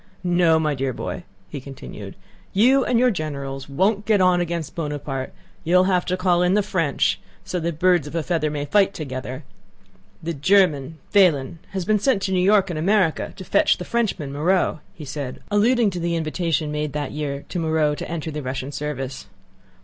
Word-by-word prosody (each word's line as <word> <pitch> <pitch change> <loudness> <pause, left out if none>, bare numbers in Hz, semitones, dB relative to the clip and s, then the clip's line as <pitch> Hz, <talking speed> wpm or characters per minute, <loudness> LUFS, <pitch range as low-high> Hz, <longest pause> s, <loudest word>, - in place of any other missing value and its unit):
No, 175 -2 +4
my 155 -2 +1
dear 135 -1 -2
boy," 90 -4 -5 0.2
he 130 +9 -7
continued, 135 0 -9 0.4
"you 255 +7 +5
and 245 - +1
your 250 +1 +4
generals 140 -6 -5
won't 200 +9 +1
get 215 -2 +4
on 180 -1 +4
against 170 -3 -3
Buonaparte; 145 -4 -4 0.3
you'll 180 +2 +4
have 185 -1 +1
to 185 - -1
call 180 -1 +2
in 180 +2 +3
the 210 - +3
French, 165 -8 0 0.3
so 180 - -2
that 170 -2 -3
birds 175 -3 +3
of 145 - -8
a 165 - 0
feather 160 -2 0
may 145 -1 -3
fight 195 +5 +3
together. 130 -2 -5 0.8
The 170 +1 -2
German, 155 -2 +2 0.2
Pahlen, 165 -7 +3
has 190 -2 -2
been 215 +1 +2
sent 220 -3 +1
to 190 - -1
New 185 - +2
York 195 -1 +4
in 165 - -4
America, 185 0 +1
to 190 - -8
fetch - - +3
the 180 - -6
Frenchman, 195 -12 -1
Moreau," 170 +2 +1 0.2
he 155 - -9
said, 140 -2 -5
alluding 225 +1 +3
to 180 - -4
the 170 0 -1
invitation 160 -2 -1
made 150 -1 -2
that 145 -2 -3
year 140 -2 -4
to 180 - -3
Moreau 160 -2 +1
to - - -6
enter 165 -1 -4
the 150 0 -4
Russian 130 +1 -4
service.... 140 -2 -5
165 Hz, 190 wpm, -22 LUFS, 145-185 Hz, 0.8 s, you